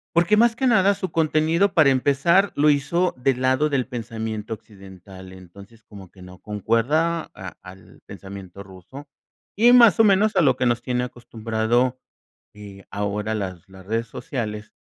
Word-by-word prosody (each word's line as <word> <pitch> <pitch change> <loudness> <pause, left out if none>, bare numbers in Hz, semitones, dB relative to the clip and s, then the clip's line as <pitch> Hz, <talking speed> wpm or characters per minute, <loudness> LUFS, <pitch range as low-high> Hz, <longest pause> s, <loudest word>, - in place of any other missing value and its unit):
porque, 175 +5 +3
más 230 0 +3
que 265 - -2
nada, 200 -5 +3
su 185 -2 -5
contenido, 160 +4 +1
para 155 -5 +4
empezar, 145 +9 +2
lo 150 +1 +3
hizo 170 +6 0
del 130 0 -1
lado 130 +4 +1
del 135 -4 -1
pensamiento 110 -3 -6
occidental. 95 -2 -14
Entonces, 100 +5 -15
como 100 -4 -14
que 95 - -19
no 90 0 -14
concuerda, 130 +11 -1
a 95 -1 -8
al 95 +1 -15
pensamiento 100 -1 -11
ruso. 95 +10 -13 0.5
Y, 235 +4 +5
más 235 -4 +6
o - - +7
menos, 210 +1 +3
a - - +4
lo 135 -5 +3
que 130 - -1
nos 120 -1 0
tiene 125 -1 -2
acostumbrado, 120 +1 -2 0.6
eh, 100 -2 -13
ahora 105 +1 -3
las 95 -5 -6
las 95 -1 -15
redes 115 +2 -2
sociales 105 -4 -6
120 Hz, 160 wpm, -22 LUFS, 100-155 Hz, 0.6 s, o